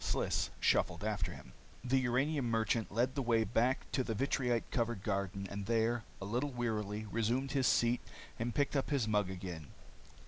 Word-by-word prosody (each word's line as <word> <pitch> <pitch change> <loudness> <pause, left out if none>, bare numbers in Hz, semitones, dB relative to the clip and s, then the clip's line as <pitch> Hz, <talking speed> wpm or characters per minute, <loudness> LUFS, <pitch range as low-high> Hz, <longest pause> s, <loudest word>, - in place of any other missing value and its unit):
Sliss - - 0
shuffled 90 +1 +2
after 100 -5 -1
him. - - -11 0.3
The 130 +1 +3
uranium 130 +1 +1
merchant 115 0 +1
led 120 +5 +1
the 140 - -1
way 115 -3 +3
back 120 +4 +1
to 130 - +1
the 115 -3 -2
vitrite 125 -1 0
covered 115 -5 -1
garden 100 -1 -1
and 100 +1 -5
there, 115 0 +1
a 100 - -5
little 120 +8 -1
wearily, 110 -4 -2
resumed 120 +5 0
his 135 -2 +2
seat 120 +1 +3 0.4
and 115 +1 -2
picked 145 0 +1
up 135 - +1
his 135 -7 +1
mug 105 -3 +2
again. 90 -5 -6
115 Hz, 175 wpm, -35 LUFS, 105-125 Hz, 0.4 s, The